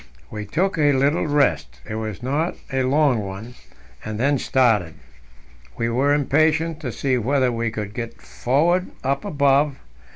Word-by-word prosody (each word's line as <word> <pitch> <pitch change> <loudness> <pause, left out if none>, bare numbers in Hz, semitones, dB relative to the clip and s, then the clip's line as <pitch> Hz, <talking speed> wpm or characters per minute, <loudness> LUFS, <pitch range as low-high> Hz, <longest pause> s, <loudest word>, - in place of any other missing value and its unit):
We 105 -1 -6
took 180 - 0
a 145 -1 +4
little 140 +4 +1
rest 80 - +1
it - - -5
was 110 -1 -5
not 150 +7 -1 0.2
a 135 - +1
long 135 -1 +2
one 100 +4 -7 0.5
and 110 0 -5
then 140 +2 +2
started. 110 -13 +2 0.8
We 115 0 -1
were 130 +5 +1
impatient 155 +3 +1
to 135 -6 -4
see 130 +1 0
whether 130 +2 +1
we 115 -1 -1
could 105 -2 -5
get 115 0 -6
forward 170 +9 0 0.2
up 135 +6 -1
above. 140 -5 +2
130 Hz, 155 wpm, -22 LUFS, 110-145 Hz, 0.8 s, a